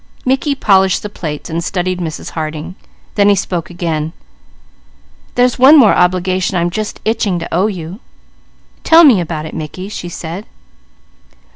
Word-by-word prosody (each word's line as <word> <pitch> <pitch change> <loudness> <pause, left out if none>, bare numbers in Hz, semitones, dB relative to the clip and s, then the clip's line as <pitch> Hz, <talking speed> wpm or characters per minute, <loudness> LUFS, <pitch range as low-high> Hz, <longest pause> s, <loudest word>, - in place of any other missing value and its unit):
Mickey 270 +2 +1
polished 190 -7 +2
the 210 - -5
plates 150 -7 -6
and 165 +1 -3
studied 185 0 -2
Mrs. 160 -3 -5
Harding. 155 +1 -5 0.4
Then 205 -1 +3
he 200 - +5
spoke 175 -3 -3
again: 165 -3 -3 1.2
"There's 245 0 +2
one 275 +5 +8
more 230 -8 +6
obligation 185 +1 +1
I'm 170 0 0
just 215 +3 -4
itching 215 -4 0
to 170 - -6
owe 185 +5 +2
you." 180 -1 -6 0.8
"Tell 330 +1 +7
me 245 - +6
about 155 -2 -4
it, 160 - -8
Mickey," 165 +5 -6
she 175 -4 -6
said. 170 +4 -7
185 Hz, 150 wpm, -15 LUFS, 165-210 Hz, 1.2 s, one